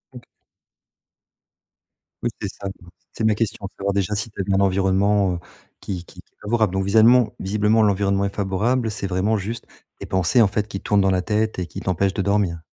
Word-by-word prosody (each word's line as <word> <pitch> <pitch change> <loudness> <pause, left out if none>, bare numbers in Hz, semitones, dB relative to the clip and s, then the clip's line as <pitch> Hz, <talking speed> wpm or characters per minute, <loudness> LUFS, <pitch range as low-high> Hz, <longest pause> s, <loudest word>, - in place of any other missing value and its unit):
OK. 120 - -10 2.0
Oui, 120 - +1
c'est 105 - -2
ça, 100 - -8
hem, 90 -2 -10 0.2
c'est - - -4
ma 110 0 +4
question, 105 -2 -2
savoir 100 0 -1
déjà 100 +1 0
si 110 +3 -2
tu 105 - -5
es - - -1
dans 95 0 +1
un - - +3
environnement, 95 0 +2
heu, - - -5 0.4
qui 90 -3 -5
qui - - -17 0.2
favorable? 110 -2 +1
Donc 95 0 0
viselement, 110 +3 +5
visiblement, 105 +3 +2
l'environnement 100 -1 +2
est 100 - -4
favorable, 110 +5 0
c'est 100 -2 -4
vraiment 95 +4 +1
juste 110 +4 -5 0.3
tes - - -6
pensées, 95 +6 +2
en 110 - +6
fait, 105 +1 -1
qui 100 -1 -6
tournent 105 -1 +2
dans 95 0 +3
la 95 -1 +1
tête 105 +2 -1
et 90 - -2
qui 80 - -8
t'empêche 95 +1 0
de 100 - -1
dormir? 100 -3 0
100 Hz, 205 wpm, -22 LUFS, 95-110 Hz, 2.0 s, en